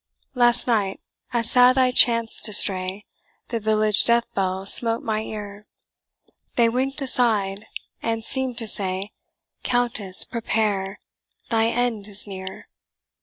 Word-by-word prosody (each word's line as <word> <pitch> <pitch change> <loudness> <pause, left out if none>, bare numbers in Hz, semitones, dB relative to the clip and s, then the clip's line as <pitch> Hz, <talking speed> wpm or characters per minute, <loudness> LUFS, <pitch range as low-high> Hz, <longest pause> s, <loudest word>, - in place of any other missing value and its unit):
"Last 240 -2 +3
night, 205 -5 0 0.3
as 230 -1 0
sad 250 +1 +5
I 255 -1 +3
chanced 230 -2 +2
to 215 - +1
stray, 190 +1 +2 0.4
The 230 - -2
village 215 -1 +2
death 235 0 +3
bell 190 0 -2
smote 230 +3 +2
my 215 -1 -2
ear; 210 -1 -8 0.9
They 235 -1 +3
wink'd 270 +4 -1
aside, 215 -6 0 0.3
and 225 -1 -3
seemed 260 -3 0
to 230 -2 0
say, 195 0 -1 0.5
'Countess, 235 -6 0
prepare, 210 -4 -2 0.5
thy 225 0 +2
end 230 -3 -1
is 205 -1 -1
near!' 190 -2 -9
220 Hz, 125 wpm, -22 LUFS, 200-240 Hz, 0.9 s, sad